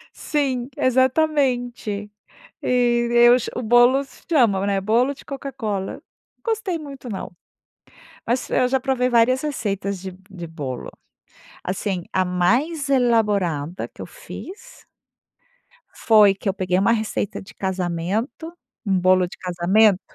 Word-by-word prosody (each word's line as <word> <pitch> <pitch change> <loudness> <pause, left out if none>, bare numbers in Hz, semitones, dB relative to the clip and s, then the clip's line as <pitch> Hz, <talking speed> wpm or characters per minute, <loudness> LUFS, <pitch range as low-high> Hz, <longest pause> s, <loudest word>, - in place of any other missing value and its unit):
Sim, 265 -4 -1
exatamente. 255 -5 +1 0.5
E 240 -1 +2
eu 240 +1 +7
ch 240 - -5
o 250 - -2
bolos 245 +4 +3
chamam, 215 - +3
né. 200 -1 +1
Bolo 235 +7 +2
de - - -16
Coca 275 0 -6
Cola, 210 -6 -4 0.4
gostei 440 -7 -1
muito 275 -4 -9
não. 195 -2 -6 0.9
Mas 245 +2 -1
eu 255 - +3
já 265 0 +1
provei 255 -1 0
várias 245 +2 +3
receitas 200 -9 -3
de 190 0 -7 0.2
de 175 -3 -7
bolo. 140 -6 -6 0.7
Assim, 185 -1 -3
a 185 0 +2
mais 250 - +1
elaborada 205 - +1
que - - -14
eu - - -5
fiz - - -11 1.1
foi 210 -3 +5
que 200 - -5
eu 190 - 0
peguei 185 -2 0
uma 195 +4 +3
receita 220 -3 -2
de 190 - -15
casamento, 190 - -3 0.3
um 190 -2 +2
bolo 185 0 +4
de - - -12
casamento, 185 +3 +3
230 Hz, 130 wpm, -22 LUFS, 190-260 Hz, 1.1 s, eu